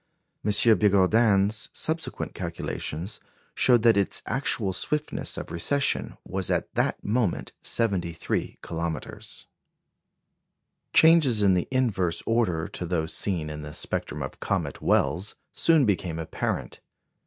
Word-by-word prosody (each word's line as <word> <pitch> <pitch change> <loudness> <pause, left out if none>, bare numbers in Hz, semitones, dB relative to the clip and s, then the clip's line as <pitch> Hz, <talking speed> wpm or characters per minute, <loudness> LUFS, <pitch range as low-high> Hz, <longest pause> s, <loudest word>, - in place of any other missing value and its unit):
M. 105 - 0 0.3
Bigourdan's 105 +1 +3
subsequent 160 +1 -3
calculations 85 +8 -4 0.3
showed 120 -3 +4
that 115 -3 +5
its 100 - 0
actual 115 -7 -1
swiftness 150 +10 -2
of - - -6
recession 140 +12 0
was 95 0 -2
at - - -1
that - - 0
moment 110 -4 0
73 90 -7 -2
kilometres. 80 -3 -5 1.5
Changes 155 -10 +5
in 95 -2 +5
the 90 -1 0
inverse 95 -10 0
order 90 -8 +1
to 90 - -5
those 80 -2 -1
seen 85 -6 -1
in 75 0 -6
the 75 0 -8
spectrum - - -4
of - - -7
comet - - -2
Wells 85 +10 +1 0.2
soon 160 -5 +4
became 90 -5 -1
apparent. 80 -1 -3
100 Hz, 120 wpm, -26 LUFS, 85-120 Hz, 1.5 s, that